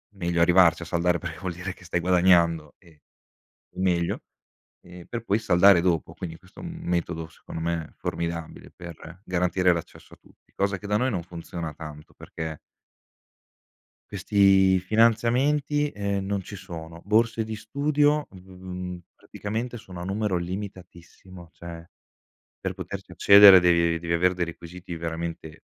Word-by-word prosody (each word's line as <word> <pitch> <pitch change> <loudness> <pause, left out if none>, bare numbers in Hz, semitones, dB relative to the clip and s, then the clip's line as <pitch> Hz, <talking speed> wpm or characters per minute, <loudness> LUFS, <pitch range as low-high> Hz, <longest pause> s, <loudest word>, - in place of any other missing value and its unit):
meglio 85 -3 -1
arrivarci 85 -1 +5
a - - -8
saldare, 85 +1 0
perché 80 -2 -6
vuol 90 -2 -4
dire 90 +1 -6
che - - -18
stai 90 0 -2
guadagnando, 85 -3 +3
e 80 -5 -22 0.7
è - - -12
meglio, 85 -2 0 0.6
e 90 0 -13
per 115 -1 -5
poi 100 0 +1
saldare 95 -3 +5
dopo. 85 -2 0
Quindi, 85 -3 -7
questo 95 +1 -21
è - - -9
un 170 - -6
metodo, 85 -2 -2
secondo 80 - -9
me, 85 -1 -3
formidabile, 85 0 -5
per 85 0 -11
garantire 90 0 +2
l'accesso 85 -1 -7
a - - -23
tutti, - - -26
cosa 100 -1 0
che, 100 - -9
da 105 - +2
noi, 130 +4 +1
non 90 -6 -2
funziona 85 -2 -7
tanto, 75 -1 -11
perché 80 -2 -7 1.5
questi 95 -1 +4
finanziamenti, 120 +8 +2
eh, 100 -3 -2
non 95 0 -2
ci 105 - -10
sono. 85 -3 -9
Borse 110 +2 +2
di 110 0 -5
studio, 145 +6 +1
mhmm, 90 -1 -8 0.2
praticamente, 115 +4 -5
sono 95 -6 -10
a 90 - -5
numero 100 0 -1
limitatissimo, 90 -1 -8
cioè, 85 -1 -10 0.7
per - - -3
poterci - - -8
accedere 100 -1 +9
devi 85 -1 +3
devi 85 0 -2
avere 90 +2 +3
dei 90 -1 -1
requisiti 85 +1 -9
veramente 80 -1 -5
90 Hz, 150 wpm, -25 LUFS, 85-100 Hz, 1.5 s, accedere